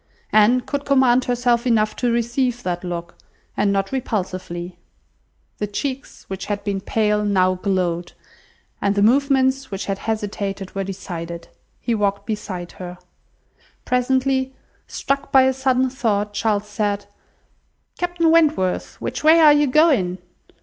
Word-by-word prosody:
Anne 215 +4 +5
could 285 +2 -4
command 260 -3 +3
herself 245 0 +1
enough 215 -3 +2
to 245 -1 0
receive 240 +1 0
that 175 -1 -3
look, 170 -1 -5 0.4
and 205 0 +2
not 195 0 -1
repulsively. 185 -8 -4 0.8
The 210 - -1
cheeks 265 +6 -5
which 190 -1 -6
had 205 -1 -3
been 200 -2 -2
pale 210 0 +1
now 185 -3 +2
glowed, 180 -2 -2 0.7
and 200 0 +1
the 200 - +2
movements 265 +2 +2
which 195 -1 -4
had 195 -1 -3
hesitated 200 -3 -4
were 195 - -2
decided. 170 -3 -7 0.3
He 235 - -1
walked 200 -2 0
by - - -3
her - - +1
side. 180 -2 -8 0.9
Presently, 260 +1 +1 0.3
struck 275 0 -2
by 265 -1 +6
a 265 0 +3
sudden 260 -1 +1
thought, 210 -5 -1
Charles 210 0 0
said— 205 -1 -2 0.9
"Captain 350 -2 +1
Wentworth, 310 - +2
which - - -4
way 320 +2 +7
are 305 -2 +8
you 295 0 +3
going? 255 - +3
215 Hz, 140 wpm, -21 LUFS, 195-260 Hz, 0.9 s, are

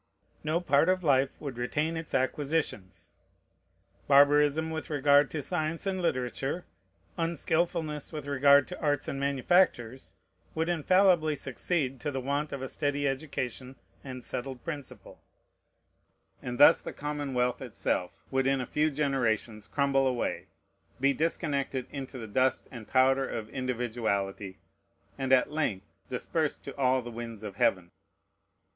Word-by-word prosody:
No 155 +2 +1
part 145 -3 +3
of 185 0 +1
life 135 -3 +2
would 135 -5 -6
retain 150 +6 -1
its 160 -1 -5
acquisitions. 130 - -2 1.0
Barbarism 145 +2 +5
with 160 0 -5
regard 145 -1 +4
to 150 -3 -4
science 160 +2 -2
and 190 -1 -1
literature, 135 +2 -2 0.5
unskilfulness 165 -2 -1
with 150 -3 -6
regard 140 0 +5
to 180 - -8
arts 145 -2 0
and 135 - -3
manufactures, 135 -3 +1 0.4
would 160 +1 0
infallibly 175 -1 +3
succeed 135 0 -2
to 145 - -3
the 135 -2 -3
want 140 +3 -2
of 135 -1 -5
a - - -3
steady 145 0 -1
education 130 -2 -4 0.3
and 130 -2 -7
settled 130 0 -5
principle; 145 -5 -8 1.2
and 125 0 -5
thus 160 +3 +8
the - - -7
commonwealth 140 -4 -2
itself 90 - -3
would 135 0 +1
in 135 0 +2
a 125 - -2
few 150 +5 +1
generations 120 -7 -1
crumble 140 -1 +2
away, 125 -2 -2 0.5
be 140 +1 +3
disconnected 140 -4 -1
into 135 -2 -6
the 115 - -6
dust 130 +5 +1
and 115 -4 -9
powder 135 +1 +3
of 110 -1 -5
individuality, 110 -6 -2 0.6
and 135 -1 -2
at 130 +2 +4
length 115 -11 -1 0.2
dispersed - - -2
to - - -8
all 130 -2 +2
the 120 - -7
winds 115 -2 -7
of 105 -2 -7
heaven. 90 -2 +1
140 Hz, 140 wpm, -29 LUFS, 125-150 Hz, 1.2 s, thus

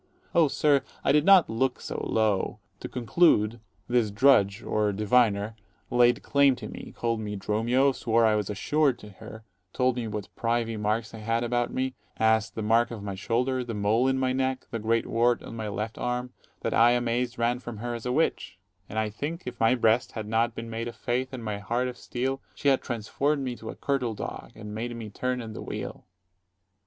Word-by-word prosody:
_ - - -42 0.3
Oh, 165 -2 +5
sir, 140 0 +3 0.2
I - - +3
did 150 +2 +4
not 195 -4 +7
look 125 +3 0
so - - -5
low. 110 -4 +1 0.2
To - - -6
conclude, 120 -3 +3 0.3
this 120 -3 +2
drudge, 105 -2 +4
or 105 -1 +1
diviner, 105 0 +2 0.4
laid 120 0 +4
claim 140 -2 +4
to - - -8
me; - - -9
called 115 -1 0
me 105 -1 -4
Dromio; 115 +7 +2
swore 115 -3 +2
I 110 - +4
was 105 -2 -1
assured 140 +6 +1
to 105 - -12
her; 110 +3 -11 0.3
told 125 -1 +1
me 120 -2 -2
what 105 -1 -6
privy 115 -1 0
marks 110 +2 -1
I 110 - -8
had 115 +2 0
about 120 0 0
me, 130 0 -1 0.2
as, 110 -1 +3
the 110 - -5
mark 115 +2 +3
of 110 -4 -7
my 100 -1 -4
shoulder, 125 +6 0
the 120 -2 -5
140 - - -4
mole 115 +5 +3
in 135 0 +2
my 130 -1 +1
neck, 130 0 -1
the 115 - -2
great 115 +1 +1
wart 120 +1 +2
on - - -8
my 110 -1 -4
left 105 +2 -4
arm, 125 +1 -2 0.3
that - - -1
I, 120 +1 +6
amazed, 120 0 0
ran 120 +1 +1
from 120 -3 -7
her 120 +3 -4
as 120 +1 -5
a - - 0
witch: 140 - 0 0.3
And, 110 - -6
I 110 -1 0
think, 155 - -5
if 125 -1 -6
my 115 +2 +4
breast 115 0 +2
had 110 -2 -5
not 115 +1 +1
been 115 0 -6
made 115 +1 -3
of 120 - -7
faith, 125 +2 -2
and 130 -3 -6
my 105 -2 -3
heart 120 +5 -1
of 125 - -5
steel, 130 +2 -3
She 140 - +1
had 135 - +3
transform'd 135 +5 -1
me 125 -2 -3
to 110 - -8
a - - -6
curtal 125 -5 -1
dog, - - -7
and 105 -1 -8
made 120 +2 -4
me 110 -3 -7
turn 125 +3 -2
i' - - -7
the 110 -1 -7
wheel. - - -6
115 Hz, 215 wpm, -27 LUFS, 110-125 Hz, 0.4 s, not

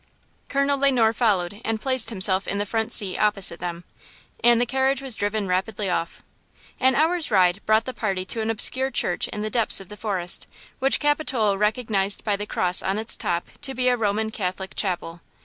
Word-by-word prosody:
Colonel 280 0 +1
Le 280 0 +4
Noir 225 -3 +3
followed 205 -3 0
and 225 -1 -2
placed 260 -2 +2
himself 190 -3 +2
in 200 - -2
the 205 - -1
front 220 +2 -2
seat 190 -3 +3
opposite 195 -5 +1
them. 175 -1 -5 0.6
And 240 -1 +5
the 245 - +2
carriage 265 +2 +1
was 265 -4 0
driven 205 0 -2
rapidly 190 +2 -1
off. 170 -1 -3 0.6
An 260 0 +3
hour's 325 +2 +1
ride 185 -5 +2
brought 220 +1 +3
the 255 - -4
party 195 -5 -2
to 225 +4 -4
an 220 - -2
obscure 260 +4 +2
church 180 -8 -1
in 210 - -5
the 215 - -4
depths 230 -3 +2
of 195 - -12
the 210 - -9
forest, 190 -5 0 0.3
which 270 +1 +3
Capitola 285 -8 +1
recognized 210 -1 0
by 210 -2 0
the 205 +1 -5
cross 180 -2 +1
on 190 +2 -1
its 220 +1 0
top 170 0 -2
to 270 -2 -2
be 255 0 +2
a 250 - +3
Roman 220 -1 -1
Catholic 190 -2 -4
chapel. 175 -3 -3
215 Hz, 200 wpm, -23 LUFS, 190-245 Hz, 0.6 s, And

